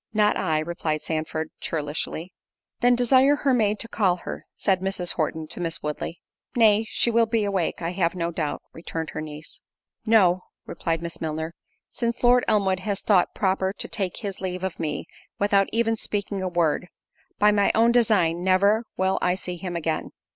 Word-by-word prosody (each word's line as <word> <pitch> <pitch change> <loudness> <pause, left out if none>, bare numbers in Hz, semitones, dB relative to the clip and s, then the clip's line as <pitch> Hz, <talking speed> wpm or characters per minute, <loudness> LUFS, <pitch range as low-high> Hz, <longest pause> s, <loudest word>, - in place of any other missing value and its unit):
"Not 210 -1 +4
I," 155 -1 0
replied 155 -1 -2
Sandford, 160 0 -3
churlishly. 155 +3 -3 0.5
"Then 245 0 +4
desire 260 +3 +5
her 280 -2 +1
maid 215 -3 +2
to 230 - -2
call 195 -6 +2
her:" 175 - -8
said 190 -2 +1
Mrs. 190 -2 -1
Horton 160 0 -2
to - - -7
Miss 165 -1 -4
Woodley. 150 +3 -4 0.3
"Nay, 220 -2 +5
she 235 - +1
will 230 0 +3
be 225 -1 +1
awake, 190 -4 -1
I 165 - -1
have 180 -1 0
no 170 -1 -1
doubt;" 155 -3 -3
returned 165 -1 -5
her 150 - -4
niece. 155 0 -8 0.4
"No;" 190 -5 +4 0.2
replied 165 -1 -2
Miss 170 -1 -6
Milner, 160 +1 -3 0.4
"since 235 0 -2
Lord 245 0 +5
Elmwood 195 -3 +2
has 200 +1 -1
thought 190 -4 +3
proper 190 -1 +1
to - - -5
take 195 -5 -3
his 200 -5 -5
leave 185 -1 -3
of 190 -3 -3
me, 150 -2 -3 0.3
without 200 -1 +3
even 225 0 +2
speaking 205 -2 -2
a 185 - -1
word; 175 -1 +1 0.5
by 210 0 +5
my 205 -1 +3
own 230 +2 +5
design, 195 -8 +3
never 200 +5 +3
will 190 +1 +1
I 180 0 +2
see 180 -1 -4
him 175 0 -5
again." 160 -2 -2
185 Hz, 180 wpm, -25 LUFS, 165-215 Hz, 0.5 s, desire